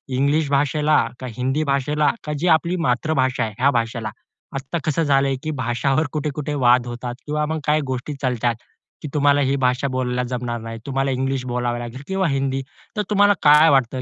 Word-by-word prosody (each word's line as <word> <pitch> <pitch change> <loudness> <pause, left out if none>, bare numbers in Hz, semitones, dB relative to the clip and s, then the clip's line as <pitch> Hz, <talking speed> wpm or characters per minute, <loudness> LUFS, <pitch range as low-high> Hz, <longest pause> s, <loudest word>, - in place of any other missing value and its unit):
English 145 +3 +1
भाषेला 150 +2 +2 0.2
का 130 - -6
हिंदी 130 +5 0
भाषेला 145 +1 +1
का 150 - -3
जी 175 - 0
आपली 170 +3 -3
मातृभाषा 130 +1 +1
आहे, 110 -1 -4
या 140 +2 +4
भाषेला? 115 -2 -1 0.5
आता 135 +5 -3
कसं 155 +2 +1
झालं 140 -2 +3
आहे, 135 - 0
की 155 - -2
भाषावर 130 +2 0
कुठे-कुठे 150 -1 -3
वाद 125 0 +4
होतात 120 0 -5
किंवा 150 0 -1
मग 160 +1 -2
काही 150 0 +2
गोष्टी 130 +3 -3
चालतात, 120 -2 0 0.5
की - - -5
तुम्हाला 145 -1 +3
ही 135 0 +1
भाषा 125 +2 +1
बोलायला 125 -1 -1
जमणार 120 -1 -3
नाही, 115 0 -7
तुम्हाला 135 0 -1
इंग्लिश 135 0 -1
बोलावं 120 -1 -2
लागेल 120 +2 -7
किंवा 190 -1 0
हिंदी. 135 -1 -1 0.4
तर - - +2
तुम्हाला 205 0 +5
काय 150 +2 +7
वाटतं, 130 -2 +2
135 Hz, 185 wpm, -21 LUFS, 125-150 Hz, 0.5 s, काय